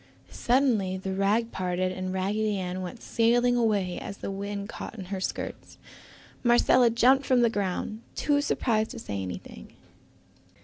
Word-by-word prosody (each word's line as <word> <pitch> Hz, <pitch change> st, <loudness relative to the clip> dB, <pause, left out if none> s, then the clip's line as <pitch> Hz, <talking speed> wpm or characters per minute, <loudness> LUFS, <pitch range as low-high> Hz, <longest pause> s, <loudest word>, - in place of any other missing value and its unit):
Suddenly 235 Hz, -7 st, +1 dB
the 190 Hz, 0 st, -4 dB
rag 210 Hz, +4 st, +1 dB
parted 185 Hz, 0 st, -1 dB
and 185 Hz, 0 st, -4 dB
Raggedy 205 Hz, +3 st, 0 dB
Ann 185 Hz, 0 st, -3 dB
went 185 Hz, +6 st, -7 dB
sailing 240 Hz, +2 st, +3 dB
away 205 Hz, -6 st, +1 dB
as 200 Hz, -, -7 dB
the -, -, -5 dB
wind 200 Hz, +1 st, -4 dB
caught 230 Hz, -, -7 dB
in 190 Hz, -, -6 dB
her 190 Hz, -, -3 dB
skirts. -, -, -5 dB, 0.7 s
Marcella 240 Hz, 0 st, +5 dB
jumped 255 Hz, +4 st, +4 dB
from 255 Hz, -2 st, +4 dB
the 235 Hz, -1 st, +3 dB
ground, 205 Hz, +2 st, -2 dB
too 290 Hz, 0 st, +2 dB
surprised 220 Hz, -6 st, 0 dB
to 255 Hz, -, -8 dB
say 100 Hz, -, -4 dB
anything. 90 Hz, -1 st, -8 dB
205 Hz, 150 wpm, -27 LUFS, 185-235 Hz, 0.7 s, Marcella